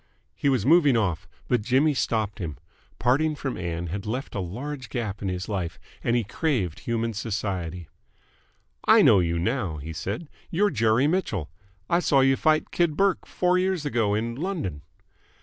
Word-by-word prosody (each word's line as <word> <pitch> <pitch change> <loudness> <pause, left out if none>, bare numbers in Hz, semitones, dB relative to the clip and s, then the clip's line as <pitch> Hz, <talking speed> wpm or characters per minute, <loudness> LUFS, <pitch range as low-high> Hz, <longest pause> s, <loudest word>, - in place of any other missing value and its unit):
He 140 - 0
was 130 -6 +1
moving 145 -4 +5
off, 95 -7 -1 0.2
but 125 -3 +2
Jimmy 135 +7 +3
stopped 110 -4 -1
him. 80 -7 -4 0.4
Parting 150 +5 +2
from 135 -3 -4
Ann 85 -1 -3
had 95 +5 -5
left 125 +5 -3
a - - -2
large 125 +9 -5
gap 110 -6 -3
in 100 - -2
his 90 0 -3
life, 95 -5 -3 0.3
and 120 - +2
he 120 - +2
craved 105 - -1
human 115 -1 -2
society. 95 -6 -3 1.0
"I - - +6
know 100 - +7
you 85 -1 0
now," 95 - -1
he 80 +3 -7
said. 100 - -4 0.2
"You're 205 +4 +2
Jerry 115 +1 +3
Mitchell. 145 - -1 0.4
I 170 - +3
saw 140 -6 +3
you 135 0 +4
fight 155 +2 +2
Kid 170 -3 +1
Burke 195 -1 +2
four 180 0 +2
years 185 -4 0
ago 115 -7 +1
in 115 +2 -1
London." 145 - -3
115 Hz, 170 wpm, -26 LUFS, 95-145 Hz, 1.0 s, know